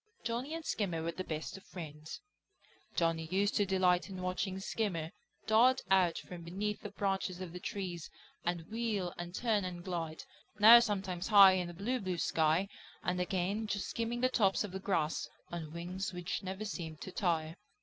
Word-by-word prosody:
Johnny 245 Hz, +7 st, -2 dB
and 330 Hz, -1 st, -6 dB
Skimmer 180 Hz, -6 st, -1 dB
were 165 Hz, -, -1 dB
the 185 Hz, +3 st, -5 dB
best 155 Hz, +2 st, -4 dB
of 195 Hz, -, -14 dB
friends. 155 Hz, -3 st, -8 dB, 0.7 s
Johnny 165 Hz, -1 st, +1 dB
used 195 Hz, +4 st, +1 dB
to 205 Hz, -, +2 dB
delight 185 Hz, -1 st, +3 dB
in 190 Hz, -1 st, -6 dB
watching 185 Hz, +1 st, -2 dB
Skimmer 185 Hz, -6 st, -2 dB, 0.3 s
dart 245 Hz, +4 st, +5 dB
out 180 Hz, -3 st, +4 dB
from 180 Hz, -1 st, -8 dB
beneath 200 Hz, +5 st, -3 dB
the 205 Hz, -, -6 dB
branches 195 Hz, -2 st, -1 dB
of 180 Hz, -3 st, -6 dB
the 180 Hz, -, -6 dB
trees 180 Hz, -4 st, -4 dB, 0.3 s
and 170 Hz, -1 st, -1 dB
wheel 220 Hz, -6 st, -1 dB
and 175 Hz, +1 st, -5 dB
turn 220 Hz, -4 st, +1 dB
and 175 Hz, -1 st, -5 dB
glide, 165 Hz, -4 st, -4 dB, 0.3 s
now 225 Hz, +3 st, +10 dB
sometimes 190 Hz, -5 st, -1 dB
high 200 Hz, -3 st, +9 dB
in 185 Hz, -2 st, 0 dB
the 175 Hz, -, -7 dB
blue, 240 Hz, +8 st, -1 dB
blue 185 Hz, -4 st, -2 dB
sky, 160 Hz, +3 st, +2 dB, 0.4 s
and 180 Hz, 0 st, 0 dB
again 190 Hz, +4 st, -1 dB
just 200 Hz, -1 st, -2 dB
skimming 235 Hz, +1 st, -2 dB
the 255 Hz, -, +5 dB
tops 205 Hz, -7 st, +2 dB
of 205 Hz, -, -5 dB
the 190 Hz, -, -4 dB
grass, 165 Hz, -5 st, 0 dB, 0.2 s
on 165 Hz, -3 st, -5 dB
wings 180 Hz, +3 st, -4 dB
which 180 Hz, 0 st, -3 dB
seemed -, -, -13 dB
never 190 Hz, +3 st, -4 dB, 0.4 s
to 190 Hz, -, -7 dB
tire. 165 Hz, -4 st, 0 dB
185 Hz, 180 wpm, -33 LUFS, 175-205 Hz, 0.7 s, now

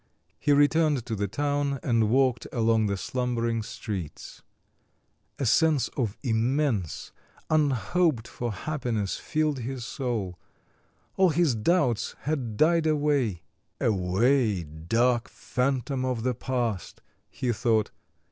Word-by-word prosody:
He 145 Hz, -, +1 dB
returned 145 Hz, -2 st, +3 dB
to 115 Hz, -, -3 dB
the 100 Hz, 0 st, -1 dB
town 145 Hz, +4 st, -1 dB
and 115 Hz, -3 st, +2 dB
walked 130 Hz, -1 st, +2 dB
along 115 Hz, -2 st, +2 dB
the 100 Hz, -1 st, -1 dB
slumbering 115 Hz, 0 st, -1 dB
streets. 95 Hz, -6 st, -6 dB, 1.0 s
A 135 Hz, -, -2 dB
sense 155 Hz, +3 st, +3 dB
of 115 Hz, -7 st, -3 dB
immense, 120 Hz, -, 0 dB, 0.4 s
unhoped 145 Hz, -, +2 dB
for 120 Hz, -1 st, -4 dB
happiness 115 Hz, -6 st, -2 dB
filled 155 Hz, -3 st, -1 dB
his 125 Hz, 0 st, -5 dB
soul; 115 Hz, -, -3 dB, 0.8 s
all 190 Hz, -1 st, +5 dB
his 160 Hz, -3 st, +2 dB
doubts 120 Hz, -, +1 dB
had 130 Hz, -8 st, -2 dB
died 165 Hz, +2 st, +3 dB
away. 145 Hz, -, +1 dB, 0.4 s
"Away, 105 Hz, +1 st, +2 dB
dark 115 Hz, +11 st, 0 dB
phantom 130 Hz, +1 st, -1 dB
of 125 Hz, -3 st, -1 dB
the 130 Hz, 0 st, +1 dB
past," 120 Hz, -6 st, -3 dB, 0.3 s
he 125 Hz, -, -2 dB
thought. 110 Hz, -2 st, +1 dB
125 Hz, 115 wpm, -27 LUFS, 110-145 Hz, 1.0 s, all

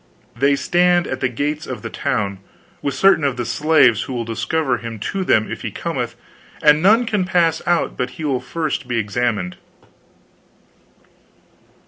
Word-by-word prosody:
They 140 Hz, +4 st, +3 dB
stand 175 Hz, +4 st, +2 dB
at 130 Hz, -, -4 dB
the 130 Hz, -, 0 dB
gates 145 Hz, +5 st, -3 dB
of 130 Hz, -, -6 dB
the 115 Hz, -, -4 dB
town, 105 Hz, -8 st, -2 dB, 0.4 s
with 140 Hz, -2 st, -2 dB
certain 195 Hz, +2 st, +4 dB
of 135 Hz, -3 st, 0 dB
the 120 Hz, -, -2 dB
slaves 140 Hz, -7 st, +3 dB
who 130 Hz, -, -5 dB
will 120 Hz, -2 st, -3 dB
discover 125 Hz, +4 st, -1 dB
him 115 Hz, 0 st, -6 dB
to 190 Hz, -, -3 dB
them 110 Hz, -11 st, +2 dB
if -, -, -5 dB
he -, -, -3 dB
cometh, -, -, -4 dB, 0.5 s
and 150 Hz, 0 st, +6 dB
none 220 Hz, +7 st, +5 dB
can 210 Hz, -4 st, 0 dB
pass 170 Hz, -3 st, +1 dB
out 175 Hz, -1 st, +1 dB
but 125 Hz, 0 st, -1 dB
he 160 Hz, -, -4 dB
will 135 Hz, -4 st, 0 dB
be -, -, -16 dB
first 155 Hz, -5 st, -3 dB
examined." 110 Hz, -4 st, -1 dB
140 Hz, 165 wpm, -20 LUFS, 120-160 Hz, 0.5 s, and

